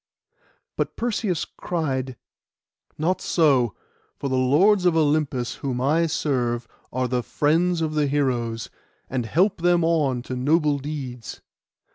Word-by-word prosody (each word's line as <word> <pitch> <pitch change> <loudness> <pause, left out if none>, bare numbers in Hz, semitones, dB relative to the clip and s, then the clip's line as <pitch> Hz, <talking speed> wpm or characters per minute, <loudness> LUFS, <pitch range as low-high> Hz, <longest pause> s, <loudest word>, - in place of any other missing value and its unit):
But - - -2
Perseus 215 -7 -1
cried, 135 -7 -3 0.8
'Not 170 +5 0
so; 135 - +2 0.4
for 140 - -3
the 130 - 0
Lords 165 +11 +4
of 170 -2 +4
Olympus, 145 -5 0
whom 130 -3 -3
I 155 +6 +2
serve, 125 -7 -1 0.2
are 130 0 -1
the 125 0 0
friends 165 +7 +1
of 155 -1 -1
the 150 -1 +1
heroes, 120 -5 -1 0.4
and 125 -3 -2
help 180 - +2
them 175 -1 +3
on 145 -7 +1
to 130 - -5
noble 145 +2 +2
deeds. 135 -5 -6
145 Hz, 130 wpm, -24 LUFS, 125-165 Hz, 0.8 s, Lords